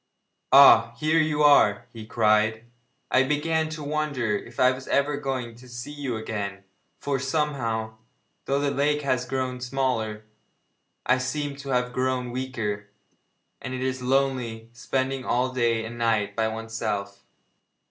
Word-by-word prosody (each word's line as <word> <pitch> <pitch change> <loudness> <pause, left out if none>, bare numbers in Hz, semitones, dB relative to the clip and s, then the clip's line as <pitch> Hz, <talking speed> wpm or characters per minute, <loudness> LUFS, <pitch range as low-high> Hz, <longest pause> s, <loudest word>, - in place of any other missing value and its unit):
'Ah! 130 -3 +8
here 155 +1 +2
you 155 -1 +1
are,' 125 -8 +5
he 110 -2 -9
cried; 110 0 +2 0.5
'I 130 - +5
began 155 +2 0
to 155 -1 -6
wonder 145 -7 -1
if 120 +3 -7
I 125 0 +6
was 130 0 -7
ever 140 +1 +1
going 130 -4 -3
to 125 +2 -15
see 120 +4 -7
you 140 -5 -4
again, 100 -3 -5 0.3
for, 140 -2 -2
somehow, 130 -6 -2 0.5
though 140 +1 +1
the 140 0 0
lake 145 +1 +1
has 130 -2 0
grown 130 -1 -3
smaller, 125 -5 -2 0.8
I 130 0 +3
seem 140 +2 -3
to 140 0 -8
have 125 -1 0
grown 130 -1 -1
weaker, 115 -5 -3 0.7
and 130 - -5
it 130 - -3
is 130 0 -2
lonely 125 -4 -1
spending 130 +2 -2
all 125 +1 0
day 115 -3 +1
and 120 +1 -8
night 110 -3 +1
by 110 -1 +1
oneself!' 110 -3 -4
125 Hz, 145 wpm, -25 LUFS, 115-140 Hz, 0.8 s, Ah